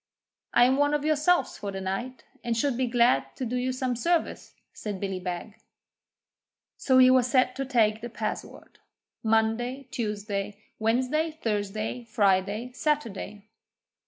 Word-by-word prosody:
'I 240 - +7
am 260 +2 +3
one 290 +1 +3
of 295 0 -2
Yourselves 310 +3 +2
for 200 -1 -4
the 195 - -5
night, 230 +7 -4 0.2
and 235 -1 -1
should 270 +2 +1
be 255 +1 0
glad 240 +1 +2
to 260 - -4
do 245 +2 -3
you 250 +1 0
some 255 -1 -2
service,' 335 +7 -1 0.2
said 205 -3 -5
Billy 195 -1 -3
Beg. 180 +3 -6 1.1
So 260 -1 +2
he 255 0 +8
was 255 -1 +4
set 255 0 +2
to 270 - -2
take 220 -4 +2
the 240 - -5
password 215 -1 -6 0.4
Monday, 225 +4 0
Tuesday, 205 -2 -3 0.2
Wednesday, 255 +8 +1
Thursday, 215 -4 -3
Friday, 205 +1 +1
Saturday. 225 -8 -2
235 Hz, 145 wpm, -27 LUFS, 210-260 Hz, 1.1 s, he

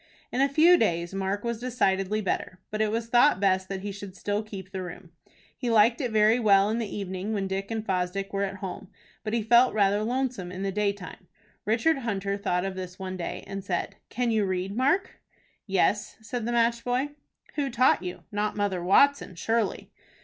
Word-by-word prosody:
In 255 - 0
a 275 - +4
few 330 +5 +6
days 170 - 0
Mark 195 +1 -2
was 235 -1 -2
decidedly 215 -4 0
better, 185 -2 -3
but 215 0 -1
it 215 - +2
was 225 +2 -1
thought 240 +1 +4
best 190 -1 +1
that 195 -1 -4
he 205 +1 -4
should 200 -1 -9
still 205 +2 -1
keep 195 -3 -9
the 190 - -4
room. 180 -1 -9 0.4
He 245 - -3
liked 230 +1 +4
it 250 - -1
very 220 +2 +4
well 200 -2 +4
in 225 - 0
the 225 - -2
evening 195 +1 -4
when 200 -2 -1
Dick 195 +1 -3
and 225 -1 -3
Fosdick 190 +1 -2
were 200 - 0
at 195 -1 -2
home, 190 -1 -6 0.4
but 215 0 -3
he 230 -2 +1
felt 240 +2 +5
rather 205 0 +3
lonesome 245 -6 -2
in 185 +1 -5
the 195 - -1
daytime. 200 -2 -3 0.4
Richard 260 +8 +2
Hunter 200 -5 -2
thought 185 -3 -1
of 195 - -3
this 185 -1 -7
one 185 -1 -5
day, 175 -2 -5
and 195 0 -6
said, 180 -3 -3
"Can 245 -1 0
you 220 -2 +2
read, 190 +1 -2
Mark?" 280 - +1 0.5
"Yes," 195 +2 +1
said 230 +1 -4
the - - 0
match 235 0 +2
boy. 250 +4 0 0.4
"Who 285 -2 -1
taught 255 -3 +3
you? 180 -1 -6
Not 210 0 -1
Mother 195 -4 -1
Watson, 280 +3 +4
surely." 225 +3 -1
205 Hz, 200 wpm, -27 LUFS, 190-235 Hz, 0.5 s, few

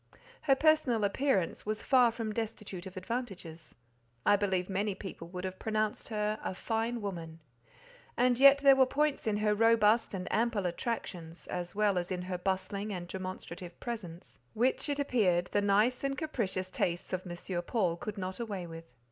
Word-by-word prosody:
Her 275 -2 +4
personal 295 -7 +3
appearance 200 - +1
was 215 0 -3
far 250 -3 +5
from 225 -2 -4
destitute 210 -4 -5
of 190 0 -10
advantages; 185 -7 -5 0.5
I - - +6
believe 190 -3 0
many 200 +1 -1
people 185 -4 -8
would 180 +1 -6
have 185 0 -5
pronounced 215 -1 -1
her 215 -1 -1
"a - - -3
fine 225 +3 -1
woman;" 165 -5 -5 0.8
and 245 0 +3
yet 275 +1 +8
there 275 -1 +8
were 260 -1 +5
points 295 -2 0
in 210 -1 +2
her 210 - +4
robust 225 0 +4
and 185 -1 -4
ample 225 -3 +1
attractions, 175 -3 -4
as 175 0 -5
well 205 -3 +3
as 175 +2 -5
in 180 -1 -2
her 180 -1 -4
bustling 195 +2 -2
and 180 -3 -5
demonstrative 185 -1 -7
presence, 190 -8 -7 0.2
which, 250 +6 +1
it 285 - 0
appeared, 190 -11 +2
the 205 - +2
nice 210 +6 +3
and 275 0 -1
capricious 195 -11 -2
tastes 175 0 -1
of 185 - 0
M. 175 +1 -4
Paul 180 -2 0
could 205 +4 -6
not 185 +1 -4
away 205 -6 -4
with. 165 0 -9
205 Hz, 175 wpm, -31 LUFS, 180-235 Hz, 0.8 s, yet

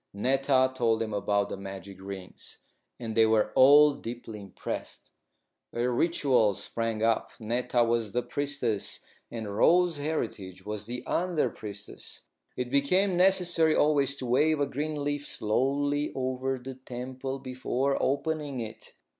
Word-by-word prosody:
Netta 130 +3 +2
told 115 -3 +1
them 110 -1 -3
about 100 0 0
the - - -5
magic 95 0 -9
rings, 95 -1 -9 0.4
and 115 -3 -5
they 110 -1 +5
were 110 -1 +2
all 145 +2 +7
deeply 115 -4 -7
impressed. 100 -2 -7 0.6
A 120 +1 0
ritual 125 - +2
sprang 115 0 -3
up. 115 -1 +2
Netta 120 +2 +1
was 115 -2 0
the 125 +2 -1
priestess 135 -5 -1 0.3
and 110 -3 -5
Rose 175 +6 +4
Heritage 105 - -4
was 105 0 -5
the 125 +1 -5
under 175 -3 0
priestess. 105 -1 -9 0.4
It 125 -1 -3
became 180 +8 +2
necessary 175 -3 +3
always 140 -2 +3
to 135 - -6
wave 145 +5 +3
a 145 - +2
green 145 +2 -3
leaf 145 0 -2
slowly 145 +6 0
over 130 0 -1
the 130 +1 -8
temple 130 +1 -6
before 130 +1 -1
opening 145 -1 -1
it. 115 -1 -8
130 Hz, 140 wpm, -28 LUFS, 110-145 Hz, 0.6 s, all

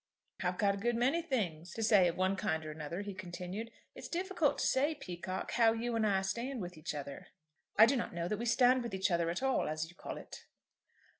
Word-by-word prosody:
"I've 180 0 -1
a 200 -1 +3
good 235 +4 0
many 260 +8 +2
things 185 - -2
to 225 - -2
say 205 -4 +6
of 170 - -2
one 185 +1 +2
kind 160 -4 -1
or 155 - -5
another," 155 +4 -5
he 200 -1 -5
continued. 185 +4 -6 0.2
"It's - - -8
difficult 350 -4 0
to - - 0
say, 290 +4 +2
Peacocke, 185 - -5
how 225 -1 +5
you 230 +1 -2
and 220 -1 +2
I 195 -2 +2
stand 235 +7 -2
with 180 -2 -5
each 155 0 -5
other." 140 -1 -7 0.5
"I 220 - +10
do 260 +4 +2
not 240 - -2
know 170 0 -3
that 210 +2 -2
we 235 - -2
stand 250 +2 +5
with 235 -5 -4
each 190 0 +1
other 170 -1 +2
at 175 +10 -2
all, 265 -1 +2
as 155 +1 -2
you - - -21
call - - -6
it." - - -11
200 Hz, 230 wpm, -34 LUFS, 175-240 Hz, 0.5 s, I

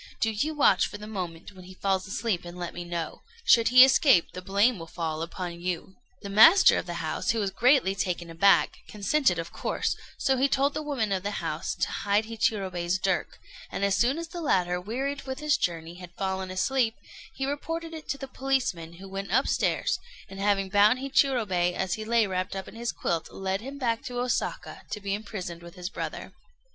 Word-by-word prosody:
Do 225 - +1
you 295 +9 -1
watch 295 - +4
for - - -8
the 210 - -9
moment 180 -5 -6
when 185 -2 -14
he 185 0 -12
falls 190 -1 -1
asleep, 200 -2 -2
and 175 0 -9
let 175 -1 -5
me 175 - -6
know. 170 -1 -5 0.2
Should 230 -1 +6
he 255 +2 +9
escape, 265 - +4
the 180 - -7
blame 200 +4 +2
will 165 - -8
fall 160 -2 -4
upon 170 +1 -5
you." 180 +1 -3 0.3
The - - -5
master 270 - +7
of - - -7
the - - -4
house, - - -2
who 230 - +2
was 200 -2 -1
greatly 245 -2 +3
taken 180 -3 -2
aback, 170 +4 +3
consented 210 - +1
of 165 0 -5
course; - - -1 0.2
so 265 -1 +1
he 270 +2 +3
told 280 +2 +2
the - - -3
woman 270 -9 -2
of 190 -1 0
the 205 +2 -3
house - - -3
to - - -1
hide 205 +2 +1
Hichirobei's 190 -6 -1
dirk, 190 -1 -1 0.3
and 200 - -1
as 200 -1 +2
soon 250 +8 +2
as 335 -1 -5
the 345 0 -6
latter, 180 - +1
wearied 270 +8 -3
with 265 0 -4
his 300 0 +2
journey, 170 - -2
had 180 -1 -9
fallen 190 -1 -2
asleep, 225 +5 +1 0.4
he 270 - -2
reported 330 +4 -4
it 315 -1 -9
to 275 - -1
the 270 - -7
policeman, 255 -12 -1
who 190 +3 -11
went 195 +1 -6
upstairs, 260 +6 +1 0.3
and 195 -1 -10
having 195 -1 +1
bound 205 +5 +5
Hichirobei 235 -10 +1
as 190 -1 -1
he 220 - -4
lay 230 0 +3
wrapped 185 0 -3
up 190 -1 -5
in - - -11
his 235 +1 -3
quilt, 165 -1 -2
led 195 +1 -3
him 270 +4 -7
back 230 -4 0
to 245 -1 -4
Osaka 250 - -2
to 210 - -4
be 200 -1 -3
imprisoned 195 -5 -5
with 170 +1 -12
his 180 0 -6
brother. - - -6
200 Hz, 210 wpm, -27 LUFS, 180-255 Hz, 0.4 s, he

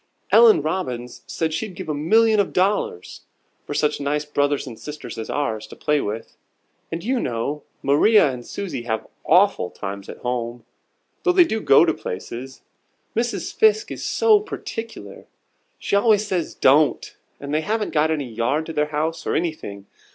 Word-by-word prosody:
Ellen 440 -6 +7
Robbins 125 -9 -3
says 160 -1 -2
she'd 190 +3 -4
give - - -7
a 155 - -1
million 215 +9 +3
of 200 - 0
dollars 185 - -1 0.5
for 145 - -4
such 150 0 0
nice 145 +1 -1
brothers 145 -1 0
and 120 -4 -9
sisters 150 0 -8
as 110 - -6
ours 110 -7 -2
to - - -12
play 150 -1 +1
with. 110 +2 -5 0.5
And, 165 0 -4
you 255 +3 0
know, 130 - -2 0.2
Maria 150 +4 +5
and 125 -1 -7
Susie 190 -1 -5
have 110 -2 -3 0.2
awful 180 - +4
times 100 0 -7
at - - -8
home, 120 -1 -4 0.6
though 365 -1 +2
they 360 -1 +7
do 220 -8 -2
go 140 +1 +6
to 160 - +2
places. 120 +7 -7 0.5
Mrs. 235 +1 -2
Fiske 435 -1 +3
is - - -6
so 445 -2 +4
particular. 230 - -7 0.5
She - - -1
always 210 0 +4
says 185 -5 -2
'Don't,' 145 +2 +3 0.2
and 140 +1 -6
they 155 - +2
haven't 210 +4 -2
got 155 0 +3
any 150 -4 -1
yard 120 +7 -1
to 165 - -6
their 150 -1 +1
house, 155 +2 -3
or - - 0
anything. 155 - -3
150 Hz, 170 wpm, -22 LUFS, 125-205 Hz, 0.6 s, Ellen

